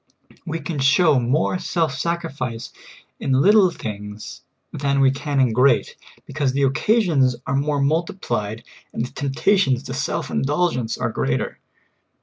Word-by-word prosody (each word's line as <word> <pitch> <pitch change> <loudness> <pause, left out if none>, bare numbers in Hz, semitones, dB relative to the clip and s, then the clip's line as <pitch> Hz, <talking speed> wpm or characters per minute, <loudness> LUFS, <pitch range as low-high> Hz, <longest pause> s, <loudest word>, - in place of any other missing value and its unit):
We 165 0 -3
can 160 -3 -5
show 140 +2 +4
more 140 +9 0
self 165 -4 -1
sacrifice 140 -6 -4 0.5
in 135 - -1
little 190 +8 +5
things 105 -8 -7 0.3
than 140 0 0
we 135 -1 +5
can 140 0 -2
in 125 -4 +3
great; 125 +2 +3 0.3
because 140 -2 -1
the 140 +1 +1
occasions 145 - +2
are 140 - -1
more 145 +1 0
mul 160 +5 +2
tiplied 115 - -4 0.3
and 115 - -2
the - - -10
temptations 140 -1 +1
to - - -6
self - - -3
indulgence 145 -5 0
are - - -2
greater. 65 +1 -2
140 Hz, 140 wpm, -21 LUFS, 125-160 Hz, 0.5 s, little